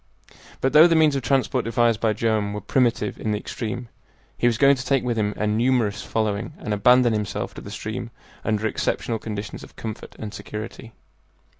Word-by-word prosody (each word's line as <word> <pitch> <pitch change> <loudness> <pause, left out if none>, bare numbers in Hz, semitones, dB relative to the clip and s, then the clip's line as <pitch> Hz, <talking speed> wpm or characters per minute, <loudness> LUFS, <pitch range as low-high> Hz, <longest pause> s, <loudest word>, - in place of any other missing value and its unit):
But 135 - +1
though 155 +3 +9
the 165 - +3
means 155 -3 +4
of 135 - 0
transport 130 0 +1
devised 115 -1 +2
by 110 -2 +2
Joam 110 -1 0
were 105 - -4
primitive 120 +3 +1
in 110 - -1
the - - 0
extreme, 115 +3 -5 0.5
he 120 - +2
was 115 -2 +2
going 140 +2 +6
to 125 - -5
take 135 0 +1
with 120 -2 -1
him 105 -2 0
a 105 - 0
numerous 110 -1 +1
following 110 +4 -2
and 105 - -3
abandon 125 +3 +5
himself 105 -2 -3
to - - -9
the - - -9
stream - - -5 0.3
under 110 0 0
exceptional 110 +1 -1
conditions 105 -2 -6
of - - -14
comfort 110 -1 -7
and 105 -1 -6
security. 110 +1 -7
115 Hz, 190 wpm, -23 LUFS, 105-125 Hz, 0.5 s, though